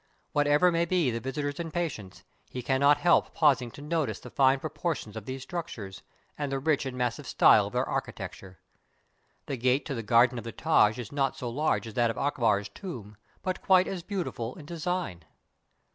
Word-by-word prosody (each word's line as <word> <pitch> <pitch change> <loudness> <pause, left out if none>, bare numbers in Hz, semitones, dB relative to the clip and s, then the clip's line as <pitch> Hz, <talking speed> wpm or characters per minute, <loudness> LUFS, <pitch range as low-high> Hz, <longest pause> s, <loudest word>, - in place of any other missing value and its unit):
Whatever 145 +4 +4
may 170 0 +1
be 170 -7 +1
the 115 - -2
visitor's 145 +4 -3
impatience, 160 - -4 0.3
he 125 - -6
cannot 140 +3 +4
help 165 +3 +3
pausing 140 -6 +3
to 140 - -11
notice 155 -1 -1
the - - -11
fine 135 -1 +4
proportions 155 - -4
of 110 -2 -7
these 130 0 -5
structures, 130 - -6 0.4
and 145 -2 -2
the 135 - 0
rich 145 0 0
and 125 -1 -6
massive 125 -1 -2
style - - +5
of - - -10
their - - 0
architecture. 95 -1 -5 0.9
The 135 - -4
gate 130 +3 +1
to 145 - -3
the 115 - -3
garden 120 +3 +4
of - - -8
the 115 - -6
Taj 120 -9 +3
is 120 -3 -7
not 135 -2 0
so 125 -5 -4
large 150 0 0
as 110 - -8
that 120 +1 +2
of 115 - -4
Akbar's 115 -8 +1
tomb, 115 - -8 0.3
but 185 -1 -2
quite 185 -1 +4
as 185 -2 -4
beautiful 170 - -4
in 150 - -11
design. 170 - -3
135 Hz, 190 wpm, -28 LUFS, 120-160 Hz, 0.9 s, style